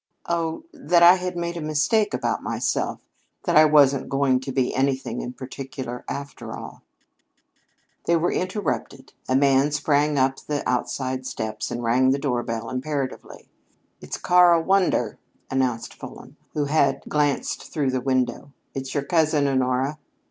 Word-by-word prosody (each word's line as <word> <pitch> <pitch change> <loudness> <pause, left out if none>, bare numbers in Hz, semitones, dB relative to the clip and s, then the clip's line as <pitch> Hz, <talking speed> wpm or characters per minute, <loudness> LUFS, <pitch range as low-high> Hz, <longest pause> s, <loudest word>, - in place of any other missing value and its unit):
"Oh, 165 - -2
that 180 - +2
I 175 +1 +10
had 180 -1 -4
made 170 0 -3
a - - -4
mistake 155 +9 +1
about - - -1
myself - - -2 0.4
that - - 0
I 155 +1 +8
wasn't 140 -3 +4
going 135 -2 +2
to 135 +1 -6
be 130 -1 0
anything 135 0 -1
in 125 - -5
particular, 130 -1 -7
after 140 -1 -6
all." - - -10 1.2
They 170 - +3
were 170 +1 +1
interrupted. 185 -8 -3 0.2
A 130 - +2
man 135 +1 +4
sprang 150 0 +1
up 135 0 +2
the 145 -1 -3
outside 130 +1 -2
steps 110 -1 -4
and 120 0 -4
rang 125 +3 +3
the 135 - +2
doorbell 120 -4 -2
imperatively. 135 0 -4 0.5
"It's - - -5
Karl 175 -2 +5
Wander," 185 - +1 0.3
announced 130 -3 -1
Fulham, - - -11 0.2
who 150 -1 +1
had 140 -1 +1
glanced 145 -2 -1
through 145 -5 0
the 130 -1 -1
window. 130 +1 -1 0.2
"It's 135 +1 -5
your 140 - 0
cousin, 155 -1 +2
Honora." 130 +2 0
140 Hz, 150 wpm, -24 LUFS, 130-155 Hz, 1.2 s, I